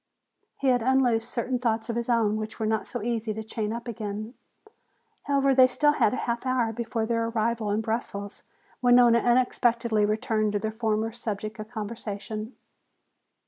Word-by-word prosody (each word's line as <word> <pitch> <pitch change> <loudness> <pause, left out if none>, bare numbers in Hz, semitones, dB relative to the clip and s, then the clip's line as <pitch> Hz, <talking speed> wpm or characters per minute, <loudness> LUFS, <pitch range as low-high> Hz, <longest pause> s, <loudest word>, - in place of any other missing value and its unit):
He 275 - +1
had 245 -1 +3
unloosed 245 -2 +2
certain 245 +1 -1
thoughts 225 -2 0
of 230 - -3
his 235 +1 -2
own 220 -3 +2
which 215 +1 -6
were 220 - -1
not 220 0 0
so - - -5
easy 225 -2 -2
to 220 - -5
chain 215 -1 -3
up 235 +1 -5
again. 215 0 -5 0.9
However, 275 -1 +3
they 260 -1 +7
still 295 +4 +3
had 220 - +2
a 255 - -2
half 235 -1 -2
hour 255 -3 0
before 230 0 -2
their 230 0 0
arrival 230 -1 -1
in 210 +2 +1
Brussels 215 -3 -4 0.4
when 245 -1 +5
Nona 240 -1 +6
unexpectedly 240 -2 +2
returned 215 0 0
to 205 - +1
their 220 +1 -2
former 220 0 -1
subject 215 -1 -5
of 215 0 -7
conversation. 215 0 -5
230 Hz, 175 wpm, -26 LUFS, 215-240 Hz, 0.9 s, they